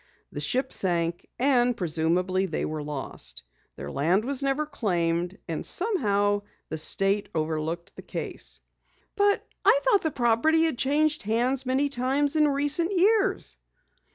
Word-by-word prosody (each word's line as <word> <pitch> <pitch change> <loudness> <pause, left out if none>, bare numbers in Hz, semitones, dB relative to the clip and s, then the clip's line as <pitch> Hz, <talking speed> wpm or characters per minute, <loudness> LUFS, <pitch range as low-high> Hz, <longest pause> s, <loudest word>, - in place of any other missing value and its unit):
The - - -6
ship 255 - -1
sank, 170 -2 0
and 245 -2 +2
presumably 180 +2 0
they 160 - -2
were 155 0 -4
lost. 135 - -6 0.3
Their 70 +1 -7
land 175 +10 +1
was 275 0 0
never 275 +2 0
claimed, 175 - -1
and 165 -2 -3
somehow 205 - +1 0.3
the 160 - -4
state 195 +5 0
overlooked 160 +2 -3
the - - -9
case." - - -5 0.5
"But 405 0 +2 0.2
I 440 +5 +5
thought - - +4
the 320 - 0
property 255 +5 +2
had 320 -7 0
changed 300 +3 +2
hands 245 +5 0
many 265 +3 +2
times 275 +2 +1
in 305 -1 +4
recent 290 +5 +2
years!" 405 +3 +2
235 Hz, 140 wpm, -26 LUFS, -, 0.5 s, I